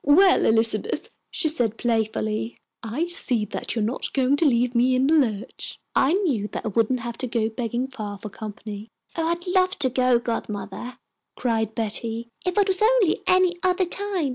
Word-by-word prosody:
"Well, 370 +7 +5
Elizabeth," 225 - +2 0.2
she 345 - 0
said, 240 -8 +1
playfully, 220 -1 -1 0.2
"I 235 +9 -2
see 250 -10 +2
that 210 - -4
you 225 - 0
are - - +1
not 235 +4 -3
going 265 0 +2
to 325 - +2
leave 245 -1 +2
me 250 +2 +3
in 255 +1 +2
the 300 - +3
lurch. 240 -6 -1 0.2
I 275 +5 +3
knew 295 - 0
that - - -6
I - - 0
wouldn't 230 +4 +1
have 235 0 -6
to 255 - -1
go 230 -2 0
begging 240 +2 -3
far 215 -6 -6
for 210 +2 -8
company." 210 +1 -8 0.3
"Oh, 325 -1 -1
I'd 340 +2 -2
love 370 +1 +2
to 260 -3 +1
go, 255 -1 +3
godmother," 230 0 -5 0.4
cried 225 -3 -1
Betty, 230 +1 -2
"if 365 +1 -2
it 410 -1 +4
was 380 0 +3
only 440 -5 +3
any 365 -1 +4
other 370 0 +2
time. 380 -4 -2
245 Hz, 190 wpm, -24 LUFS, 220-330 Hz, 0.4 s, Well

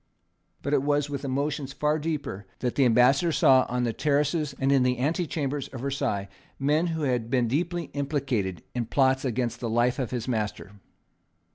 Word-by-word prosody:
But 140 - -1
it 140 - +4
was 145 0 0
with 140 -1 -4
emotions 140 0 -2
far 150 +1 0
deeper 145 -11 -4
that 125 -2 -2
the 135 - +3
Ambassador 125 +8 +4
saw 130 -4 +5
on 125 0 -1
the 115 -2 0
terraces 150 +1 0
and 135 +1 +1
in 135 -2 +4
the 125 0 +2
antechambers 145 -1 -1
of 125 - -8
Versailles 125 -7 -1 0.3
men 150 +5 +2
who 160 -2 -2
had 125 -4 0
been 125 -2 +2
deeply 170 +5 -2
implicated 135 - -2
in 120 -2 -2
plots 130 0 +2
against 125 -2 -1
the 120 - -3
life 120 +4 +1
of 130 - -1
his 120 -2 -4
master. 105 -4 -3
135 Hz, 175 wpm, -26 LUFS, 125-145 Hz, 0.3 s, saw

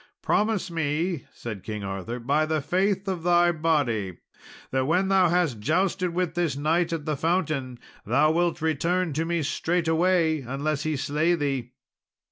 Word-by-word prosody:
"Promise 210 -4 +1
me," 160 +1 -1
said 110 -5 -7
King 105 -1 -5
Arthur, 95 +5 -4
"by 145 +6 +1
the 155 0 0
faith 195 +6 0
of 185 -3 -2
thy 175 0 +4
body, 145 - 0 0.5
that 130 0 0
when 185 +4 +2
thou 190 -3 +4
hast 165 -9 +1
jousted 180 - 0
with 175 -1 -1
this 170 -6 -1
knight 165 +4 +1
at 160 -3 -3
the 155 -2 -1
fountain, 155 -6 -1 0.3
thou 140 +8 +3
wilt 170 -1 0
return 165 +2 0
to 160 +3 -1
me 170 -1 -1
straightway, 165 0 +1
unless 140 +4 -2
he 155 0 -1
slay 155 +5 +1
thee." 135 -6 -2
160 Hz, 155 wpm, -26 LUFS, 140-175 Hz, 0.5 s, thy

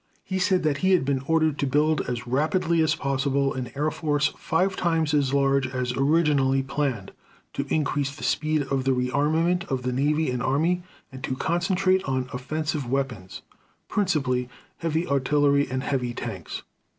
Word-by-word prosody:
He 190 -1 -3
said 185 -1 +2
that 150 -2 +1
he 190 +3 +3
had 175 -7 +3
been 135 -1 0
ordered 160 -2 +2
to 140 - +1
build 150 +3 +2
as 125 0 -3
rapidly 160 +6 +1
as 160 - +2
possible 140 0 0
an 130 -2 -4
air 150 +2 0
force 150 -2 +1
five 185 +3 0
times 165 -3 +1
as 140 -3 +2
large 140 -1 +2
as 125 -1 -2
originally 135 -2 +2
planned, 135 -7 -2 0.4
to 140 - -3
increase 145 -2 0
the - - -10
speed 155 -1 +1
of 135 -1 -1
the 135 0 +2
rearmament 155 +8 +1
of 130 -6 -3
the 125 0 -1
navy 150 +2 +1
and 125 -1 -2
army, 160 +8 +1 0.3
and 130 0 -10
to 130 - -2
concentrate 185 +5 +1
on 130 -1 -1
offensive 145 +1 -3
weapons, 125 -9 -3 0.5
principally 135 -11 0 0.3
heavy 165 0 -1
artillery 140 0 +2
and 130 0 -2
heavy 125 -4 -1
tanks. 95 -9 -6
140 Hz, 165 wpm, -25 LUFS, 130-160 Hz, 0.5 s, he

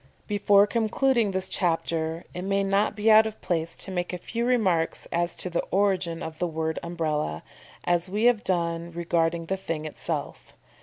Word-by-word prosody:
Before 205 -1 +4
concluding 230 +1 +1
this 190 -1 0
chapter, 165 -2 -1
it 180 - -5
may 195 +1 0
not 200 +2 +1
be 215 +1 +3
out 220 +1 +7
of 220 - -8
place 170 -1 -1
to 195 - -3
make 175 -1 -2
a - - -2
few 230 +6 -3
remarks 190 -10 +1
as 170 +1 0
to - - -1
the 175 -1 -1
origin 185 -4 +1
of 160 -1 -7
the 175 - 0
word 160 -1 -2
Umbrella, 155 - -2 0.4
as 175 +1 +1
we 210 +4 -1
have 240 -3 +4
done 170 -2 -1
regarding 170 0 0
the 190 +3 -2
thing 165 -4 -4
itself. 155 - -5
180 Hz, 175 wpm, -26 LUFS, 165-205 Hz, 0.4 s, out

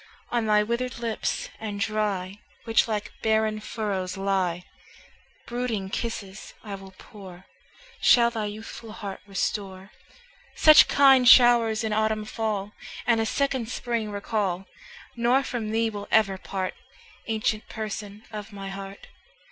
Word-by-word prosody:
On 235 -2 0
thy 210 0 +4
withered 235 +3 -2
lips 230 -2 -2
and 210 -2 -5
dry, 200 -2 -1 0.2
Which 225 0 +3
like 210 -2 -3
barren 220 -1 +1
furrows 200 -4 -3
lie, 190 -3 0 0.8
Brooding 235 -6 -3
kisses 205 -4 -5
I 210 -3 -7
will 195 -1 -10
pour, 190 -3 -12 0.6
Shall 235 -1 +6
thy 220 -3 -3
youthful 215 +1 -8
heart 200 -3 -6
restore, 195 -1 -3 0.6
Such 310 -1 +8
kind 265 -3 +6
show'rs 235 -3 +6
in 220 -1 -1
autumn 215 0 0
fall, 215 -2 -3 0.3
And 230 -2 +3
a 225 - 0
second 265 -2 -1
spring 235 -3 -2
recall; 200 -2 -2 0.5
Nor 245 +3 +3
from 235 -5 -4
thee 225 +1 +1
will 205 -1 -7
ever 195 -3 +3
part, 190 -1 -3 0.5
Ancient 220 -1 -1
Person 215 -1 -6
of 210 0 -7
my 195 -1 -7
heart. 195 0 -8
215 Hz, 130 wpm, -26 LUFS, 195-230 Hz, 0.8 s, Such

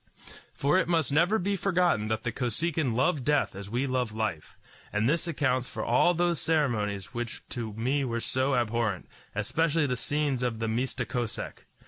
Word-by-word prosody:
For 145 +7 +3
it - - 0
must 160 -6 +1
never 170 +9 +4
be 200 0 0
forgotten 180 - +2
that 110 0 -1
the 120 - -1
Kosekin 130 +2 -1
love 135 +2 +2
death 145 -6 +1
as 100 0 -7
we 120 +5 0
love 125 -4 -1
life; 110 -8 -3 0.3
and 105 +2 +1
this 165 +4 +1
accounts 130 -5 0
for - - -4
all 175 0 +4
those 175 -2 +1
ceremonies 120 -9 0
which 120 -1 -5
to 115 -3 -4
me 130 +6 0
were 115 -3 -1
so 130 +3 +1
abhorrent, 115 -4 0 0.3
especially 150 +8 +1
the 125 -3 0
scenes 145 0 0
of 120 -2 -1
the 115 0 -2
Mista 125 +2 -1
Kosek. 120 -3 -4
130 Hz, 175 wpm, -28 LUFS, 115-155 Hz, 0.3 s, never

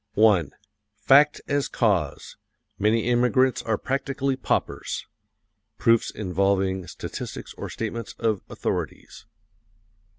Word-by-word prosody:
FACT 145 +5 +5
AS 145 -1 0
CAUSE: 95 - 0 0.4
Many 110 +2 +2
immigrants 125 +2 +3
are 110 -2 -1
practically 135 +1 -1
paupers. 130 - -2 0.7
(Proofs 115 -1 +3
involving 95 -1 0
statistics - - -7
or - - -7
statements 115 0 -5
of 110 -4 0
authorities.) - - -4
115 Hz, 90 wpm, -25 LUFS, 100-130 Hz, 0.7 s, FACT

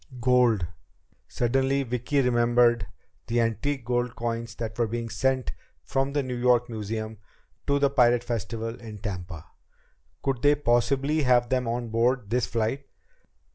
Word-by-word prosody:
Gold! 120 -6 +3 0.6
Suddenly 135 +3 +1
Vicki 125 +3 0
remembered 120 -3 +3 0.4
the 120 +1 +1
antique 120 +3 -1
gold 120 0 -1
coins 115 -2 -3
that 110 -2 -5
were 120 - +2
being 115 +1 -4
sent 130 +1 0 0.3
from 135 +1 -1
the 145 -1 +1
New 130 -1 -4
York 120 0 +3
museum 110 0 -4 0.5
to 140 - +3
the 140 -1 +2
Pirate 120 -3 +4
Festival 115 0 -3
in 110 -2 -8
Tampa. 90 -6 -6 0.8
Could 135 -3 -1
they 145 0 +5
possibly 140 +3 +1
have 125 -3 +3
them 125 -2 0
on 120 0 -2
board 115 -1 +1
this 125 0 +1
flight? 120 +5 -2
120 Hz, 140 wpm, -26 LUFS, 115-130 Hz, 0.8 s, they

